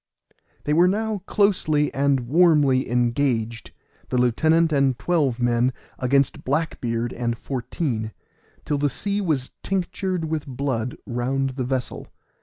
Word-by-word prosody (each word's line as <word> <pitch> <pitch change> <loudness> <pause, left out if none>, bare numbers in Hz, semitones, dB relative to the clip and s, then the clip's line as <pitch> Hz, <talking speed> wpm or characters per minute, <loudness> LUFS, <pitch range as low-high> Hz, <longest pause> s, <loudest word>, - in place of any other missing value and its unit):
They 150 - 0
were 175 +3 +5
now 215 +2 -1
closely 155 -8 +2
and 140 -1 +2
warmly 145 -1 +3
engaged, 120 -2 0 0.4
the 125 - 0
lieutenant 160 +7 +3
and 135 -3 +2
twelve 145 -9 0
men 120 +1 +2 0.3
against 135 +1 +1
Black 155 +5 -1
beard 115 0 -2
and 120 -1 -2
fourteen, 120 -3 -3 0.5
till 145 -1 -1
the 145 0 +2
sea 200 +9 -2
was 150 -9 -1
tinctured 185 -2 -2
with 155 -2 -3
blood 130 -3 -2
round 130 +3 -1
the 130 -1 -3
vessel. 130 -1 -3
135 Hz, 130 wpm, -23 LUFS, 125-160 Hz, 0.5 s, were